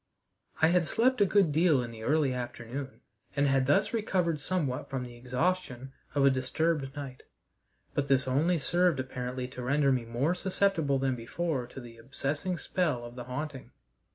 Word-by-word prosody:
I 160 - +7
had 175 -2 +3
slept 250 0 +2
a 200 - +6
good 195 -5 +4
deal 155 -4 +3
in 120 - -6
the 110 -1 -10
early 145 +2 +2
afternoon, 125 +2 -6 0.3
and 140 0 +3
had 135 -1 +2
thus 145 - +3
recovered 180 -8 0
somewhat 145 -5 -2
from 130 -2 -3
the 120 -1 -9
exhaustion 130 +1 -2 0.2
of 140 -1 +4
a 140 - +6
disturbed 135 +2 -1
night, 135 -3 -7 0.7
but 140 -1 0
this 135 -1 +2
only 155 +7 +2
served 175 +1 +2
apparently 125 -1 -4
to 125 - -8
render 140 +2 +2
me 125 -3 0
more 120 +8 0
susceptible 180 -6 +1
than 135 -1 0
before 130 +2 -2
to 135 - -10
the 120 -2 -11
obsessing 145 +8 -3
spell 155 -12 -1
of 120 - -9
the 125 -1 -7
haunting. 140 +1 -5
140 Hz, 175 wpm, -30 LUFS, 125-165 Hz, 0.7 s, I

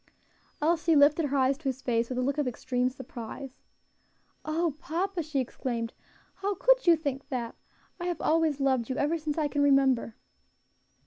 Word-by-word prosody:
Elsie 325 0 +3
lifted 295 +2 +5
her 280 0 0
eyes 265 +1 +2
to 320 - -23
his 260 0 -5
face 235 -1 0
with 255 - -3
a 255 - +1
look 280 +3 0
of 290 - 0
extreme 250 +1 -1
surprise. 255 +1 -9 0.8
"O 320 0 0
papa!" 350 +3 -2
she 305 -3 -2
exclaimed, 235 -2 -3 0.4
"how 400 +1 -1
could - - +3
you 340 - +8
think 280 -3 -4
that? 240 -4 -3 0.5
I 350 - -4
have 350 - -2
always 315 -3 +2
loved 265 -4 +1
you, 260 - -1
ever 315 +3 +1
since 305 0 -3
I 305 -2 +1
can 290 0 -1
remember." 270 -5 +3
285 Hz, 175 wpm, -28 LUFS, 255-320 Hz, 0.8 s, you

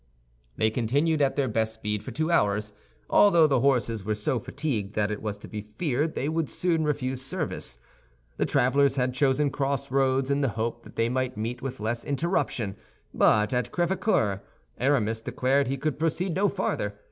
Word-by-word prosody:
They 110 0 +2
continued 145 +7 +1
at 135 -1 +2
their 140 -2 +1
best 110 0 -1
speed 105 -2 -3
for 120 - -8
two 155 +7 -1
hours, 105 -7 +1 0.3
although 170 -6 +6
the 135 -4 +3
horses 115 -5 +1
were 110 +2 -1
so 105 +4 -1
fatigued 115 -5 -3
that 105 0 +1
it 105 - -4
was 105 -2 -3
to - - -11
be 105 - -5
feared 135 - -2
they 140 - -1
would 160 -1 -1
soon 170 -3 0
refuse 135 -4 -1
service. 135 - -4 0.6
The - - +1
travelers 135 +2 +3
had 125 -1 0
chosen 140 +2 +2
crossroads 135 -1 0
in 140 +1 +1
the 135 - +2
hope 115 +1 -2
that - - -13
they 115 - +2
might 130 -1 -1
meet 120 +3 -3
with 130 -1 -5
less 115 +2 -2
interruption; 140 - -1 0.4
but 105 +1 +3
at 125 0 -1
Crèvecœur, 175 - +1 0.4
Aramis 115 -5 +1
declared 135 +4 +1
he 135 +1 -1
could 150 +1 -2
proceed 165 +3 0
no 195 +3 +2
farther. 105 - -2
130 Hz, 180 wpm, -27 LUFS, 110-145 Hz, 0.6 s, although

